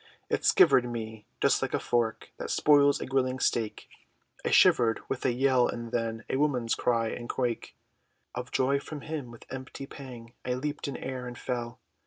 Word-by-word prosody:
It - - 0
skivered 125 -1 +5
me, 110 -2 -6
just - - +3
like - - -2
the - - +2
fork, 115 -2 -1
That - - -5
spoils 145 -1 +5
a - - -4
grilling 130 -1 0
steak, 115 -4 -1 0.6
I - - 0
shivered, 115 -2 +5
with 135 - -3
a - - +3
yell, 130 0 +3
and 115 -1 -5
then, 115 -2 -2
A - - -1
woman's 130 -6 +1
cry, 115 -2 +1
and 120 +1 -6
crake 120 -3 -2 0.6
Of 125 +1 -5
joy 135 +2 +2
from 145 +1 -8
him, 150 -5 -5
with 115 -1 -13
mighty 130 +1 -7
pang, 125 -4 -10
I 125 0 -1
leaped 145 +3 -3
in 140 - -4
air, 130 -1 -5
and 120 -1 -7
fell! 120 -2 -4
125 Hz, 185 wpm, -29 LUFS, 120-135 Hz, 0.6 s, skivered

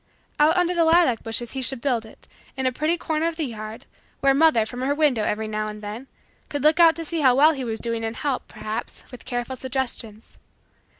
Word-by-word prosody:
Out 310 +4 +4
under 355 0 +2
the 340 -1 +3
lilac 325 -8 +4
bushes 225 +1 -2
he 265 - -4
should 260 0 -2
build 235 -4 -1
it, - - -14 0.3
in 265 - -2
a 255 - +3
pretty 310 +6 0
corner 320 -1 -1
of 335 - -3
the 320 -2 -2
yard, 215 -3 -7 0.3
where 275 0 +4
mother, 285 -6 +4
from 245 +3 -7
her 280 +2 0
window, 290 -8 +2
every 215 +1 -1
now 215 0 -2
and 210 0 -8
then, 215 +6 -7 0.4
could 285 -2 -3
look 305 +2 +4
out 330 -1 +7
to 330 - -5
see 330 +1 -3
how 260 -4 +5
well 300 +4 +6
he 270 -4 -4
was 225 -2 -3
doing 230 -1 -3
and 225 0 -3
help, 275 +1 -2
perhaps, 215 +2 -6
with 250 - -11
careful 245 0 -3
suggestions. 250 -4 -4
260 Hz, 225 wpm, -24 LUFS, 225-305 Hz, 0.4 s, out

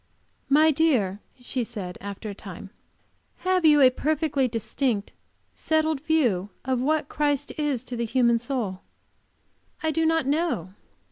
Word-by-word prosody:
"My 310 +3 +5
dear," 260 - +2 0.2
she 245 0 -3
said, 205 -6 -6
after 200 +2 -7
a 205 - -4
time, 195 -1 -10 0.7
"have 370 -2 +2
you 300 -2 +6
a 255 -1 +7
perfectly 295 -1 0
distinct, 230 -1 -2 0.4
settled 315 -2 0
view 250 - +1 0.2
of 260 -2 0
what 300 +1 +1
Christ 290 -2 0
is 290 -5 -1
to 245 -1 -6
the 235 0 -1
human 235 0 +3
soul?" 235 -7 -3 1.0
"I 315 - +1
do 325 +1 0
not 325 -3 +2
know. 275 - -1
265 Hz, 140 wpm, -25 LUFS, 225-310 Hz, 1.0 s, a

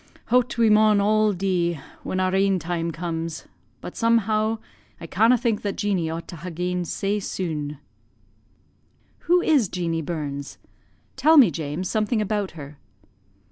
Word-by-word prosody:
Hout 250 -1 +2
we 230 -1 +4
maun 210 -1 +5
all 215 +1 +3
dee 175 -4 -1 0.2
when 185 - -3
our 185 0 +1
ain 195 0 +3
time 170 0 -2
comes; 165 -1 -4 0.4
but, - - -8
somehow, 225 -1 +2 0.4
I - - -8
canna' 225 +9 +3
think 230 -3 -1
that 200 -1 -3
Jeanie 195 -6 -1
ought 165 +1 -5
to 170 - -8
ha' 175 +3 -7
gane 180 +1 -2
sae 200 +4 -1
sune." 155 -7 -4 1.5
"Who 355 0 +5
is 275 - +3
Jeanie 165 -2 -2
Burns? 145 -3 -5 0.6
Tell 310 +4 +5
me, 240 - +7
James, 155 +4 -4
something 215 +2 0
about 205 -4 -2
her." 145 -1 -10
185 Hz, 145 wpm, -24 LUFS, 165-215 Hz, 1.5 s, me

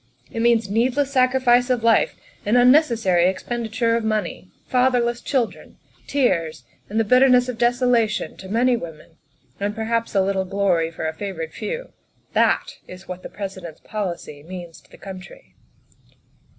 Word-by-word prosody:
It 225 - -3
means 230 -2 +3
needless 250 +7 +1
sacrifice 255 -1 +3
of 245 -3 0
life 230 -1 +3 0.3
and 215 +4 +2
un 245 +1 +7
necessary 225 - +3
expenditure 230 +3 -1
of 230 - -1
money; 215 -3 -2 0.2
fatherless 245 -2 +1
children; 255 -5 -2 0.3
tears, 170 - 0 0.3
and 215 +2 -1
the - - +4
bitterness 250 +2 +5
of 245 -2 -5
desolation 240 -2 +1
to 190 - -10
many 240 +4 +3
women; 165 -8 -9 0.4
and 205 +1 -2
perhaps 230 0 -2
a 195 - +5
little 190 0 0
glory 185 -4 +1
for 160 -1 -5
a 160 - -3
favored 165 -3 -6
few. 480 - -5 0.4
That - - +1
is 185 +1 -12
what 180 0 -7
the - - -8
President's 190 -5 -7
policy 175 -8 -5
means 175 0 -9
to - - -27
the - - -16
country." 195 - -11
220 Hz, 150 wpm, -22 LUFS, 185-245 Hz, 0.4 s, un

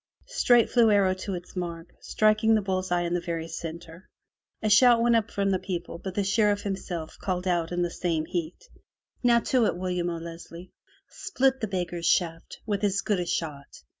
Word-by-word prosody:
Straight 245 - +3
flew 240 -2 +5
J^^^^S - - +5
^^^ - - +4
arrow 190 -2 +3
to 185 +1 -5
its 175 +2 -10
mark, 170 -2 -5
striking 215 +1 +2
the 215 - +1
bull's 185 -1 -2
eye 175 0 +2
in 170 0 -2
Wf^^^ 175 - +1
the - - -4
very 165 -1 -3
centre. 165 +2 -8 0.5
A - - +1
shout 235 +3 +6
went 235 0 +3
up 220 -2 +1
from 200 0 0
the 190 - +1
people, 175 -3 -5
^m^^jj - - -22
but 190 -1 -4
the 205 - +1
Sheriff 205 +1 +2
himself 180 -5 -5
called 180 -1 -2
out 175 -2 0
in 175 0 0
some 165 -2 -2
heat: 170 -2 -4
^f'^'^^^ - - -24 0.4
*'Now 235 -1 +4
to 245 -3 +2
it, - - -2
William 180 -1 -2
O'Leslie. 170 +1 -8 0.4
Split 265 -7 0
the 220 - -1
beg 180 -3 -2
^^wPvH - - -18
gar's 170 -1 -3
shaft 165 -2 0
with 205 -2 -2
as 200 -1 +1
good 205 -3 0
a 175 - -3
shot. 150 -5 -3
185 Hz, 220 wpm, -26 LUFS, 170-210 Hz, 0.5 s, shout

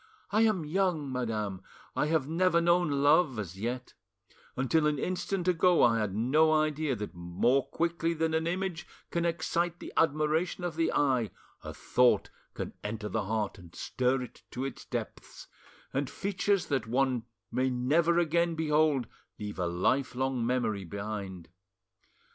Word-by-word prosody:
I 215 +2 +3
am 215 -8 +2
young, 165 -4 0
madam, 110 -6 -2 0.3
I 150 - +1
have 155 -4 +1
never 170 +2 +3
known 170 0 +3
love 150 -3 +4
as 95 -3 -5
yet—until 130 +5 -3
an 150 -1 +1
instant 185 +3 -2
ago 180 0 +4
I 115 -1 +4
had 105 -3 -2
no 150 +8 +3
idea 155 -2 +1
that 105 -2 -6
more 95 +10 +1
quickly 170 +1 -1
than 160 0 0
an 160 +1 +1
image 180 -1 -2 0.2
can 170 0 0
excite 170 +1 -1
the - - -9
admiration 160 +3 +1
of 175 -2 -2
the 165 0 +1
eye, 130 -6 +2 0.3
a - - -6
thought 125 -1 +2 0.2
can - - -5
enter 105 0 -4
the - - -1
heart 105 -1 -2
and 85 -1 -14
stir 130 0 0
it 125 - -11
to 130 +2 -4
its 135 - -6
depths, - - -6 0.5
and 135 0 -1
features 200 -1 0
that 130 -6 -1
one 125 -1 +1 0.3
may 130 +1 +1
never 155 +7 +2
again 170 0 +2
behold 150 -4 +2 0.3
leave 105 -2 -6
a 90 - +1
lifelong 130 +7 0
memory 115 -5 0
behind. 100 -1 -6
140 Hz, 150 wpm, -30 LUFS, 115-165 Hz, 0.5 s, love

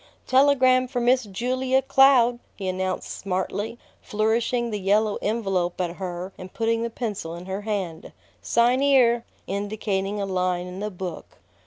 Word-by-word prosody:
"Telegram 260 -1 +4
for 250 -1 -2
Miss 250 +1 +3
Julia 255 +6 0
Cloud!" 255 -3 +5 0.2
he 195 - -5
announced 185 0 -2
smartly, 200 +4 -3 0.2
flourishing 230 +3 0
the 210 - -2
yellow 205 +2 +2
envelope 195 -6 -1
at 175 -1 -2
her 185 0 -5
and 185 0 -9
putting 230 0 0
the 235 - -1
pencil 210 -8 -4
in 175 +1 -9
her 190 +2 -4
hand. 195 -6 -4 0.3
"Sign 245 +3 +2
'ere!" 245 -4 +4 0.2
indicating 200 0 -2
a 200 - -1
line 180 -2 -1
in 180 +1 -8
the 210 +1 -2
book. 185 -3 -7
210 Hz, 150 wpm, -24 LUFS, 185-240 Hz, 0.3 s, Cloud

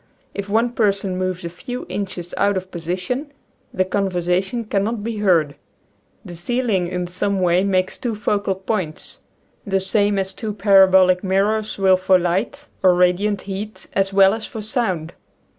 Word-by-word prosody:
If 200 0 -5
one 230 +3 +2
person 200 -5 0
moves 185 -1 -3
a - - -3
few 245 +8 -7
inches 185 -3 -5
out 200 -1 +2
of 185 0 -6
position 185 - -4 0.4
the 185 - 0
conversation 190 +3 -1
cannot 210 +1 -1
be 225 0 -3
heard. 170 -8 +2 0.7
The 175 - -8
ceiling 205 0 -1
in 180 0 -3
some 190 +3 -1
way 180 0 +3
makes 185 -2 0
two 235 -3 -2
focal 205 -2 -1
points 185 -4 -4 0.4
the 195 -1 0
same 200 +1 +1
as 190 0 -1
two 215 +1 -4
para 195 -1 +6
bolic 185 0 +4
mirrors 205 +3 0
will 190 -1 +4
for 185 0 +4
light 190 +12 -2
or 185 -2 +5
radiant 180 +3 +2
heat 205 +2 -6
as 195 0 +1
well 195 0 +5
as 220 -1 -5
for 220 - -7
sound. 190 -8 -2
195 Hz, 160 wpm, -20 LUFS, 185-210 Hz, 0.7 s, para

